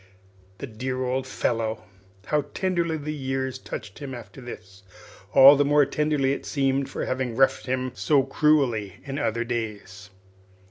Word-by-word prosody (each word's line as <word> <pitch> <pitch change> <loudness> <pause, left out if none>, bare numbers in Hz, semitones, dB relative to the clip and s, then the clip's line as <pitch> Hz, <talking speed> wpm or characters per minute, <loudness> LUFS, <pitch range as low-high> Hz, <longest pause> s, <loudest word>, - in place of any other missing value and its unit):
The - - -6
dear 130 +2 -4
old 130 +1 -1
fellow! 115 -4 -2 0.4
How 150 -2 0
tenderly 170 -4 0
the 150 0 -4
years 130 -2 -3
touched 105 -3 -8
him 135 -3 -6
after 120 +1 -11
this 95 -6 -10 0.5
all 135 +1 +9
the 145 - +3
more 145 0 +4
tenderly, 145 -1 +1
it - - -5
seemed, 135 -1 0
for - - -4
having 130 -2 -2
roughed 135 +1 +2
him 130 0 -1
so 135 +9 +2
cruelly 135 - +1
in 140 0 -5
other 115 -4 0
days! 105 -5 -5
130 Hz, 150 wpm, -25 LUFS, 115-140 Hz, 0.5 s, all